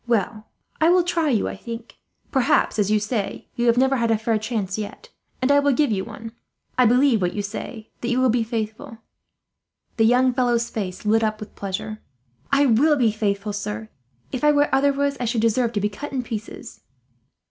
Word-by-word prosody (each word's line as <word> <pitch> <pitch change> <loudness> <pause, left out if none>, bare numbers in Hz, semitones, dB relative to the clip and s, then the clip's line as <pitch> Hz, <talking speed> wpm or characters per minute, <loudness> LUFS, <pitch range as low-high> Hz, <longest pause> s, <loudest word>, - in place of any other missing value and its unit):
"Well, 215 -1 -1 0.3
I 320 - +5
will 360 0 +5
try 335 -3 0
you, 230 -6 +1
I - - -4
think. 230 0 -9 0.3
Perhaps, 255 -4 +2
as 205 -1 +2
you 215 0 +3
say, 205 -1 -3
you 240 0 -1
have 235 0 +4
never 265 +1 +3
had 230 -1 0
a 225 - +3
fair 220 0 0
chance 215 -4 -3
yet, 215 - -7 0.3
and 260 - +3
I 285 - +6
will 285 -1 +2
give 290 -1 +2
you 190 -2 0
one. 225 +3 -9 0.4
I 250 -2 +5
believe 250 -1 +4
what 180 -1 -1
you 205 - -2
say, 220 +2 -7
that 240 - -2
you 245 +1 +1
will 255 -2 +4
be 240 +1 +1
faithful." 225 +2 -5 1.0
The 225 - +4
young 250 +2 +4
fellow's 240 -2 +1
face 195 -2 -5
lit 225 +2 +3
up 215 0 -1
with 215 - -9
pleasure. 200 +2 -5 0.5
"I 280 +1 +4
will 280 +5 +4
be 240 -6 +2
faithful, 205 -1 -2
sir. 110 - -5 0.4
If 255 - -4
I 300 - +6
were 290 -1 +2
otherwise, 280 +1 +2
I 245 - -1
should 230 -1 0
deserve 230 +1 +2
to 210 - 0
be 205 - +2
cut 285 +8 -7
in 260 -2 -2
pieces." 225 -2 -7
230 Hz, 205 wpm, -23 LUFS, 215-260 Hz, 1.0 s, I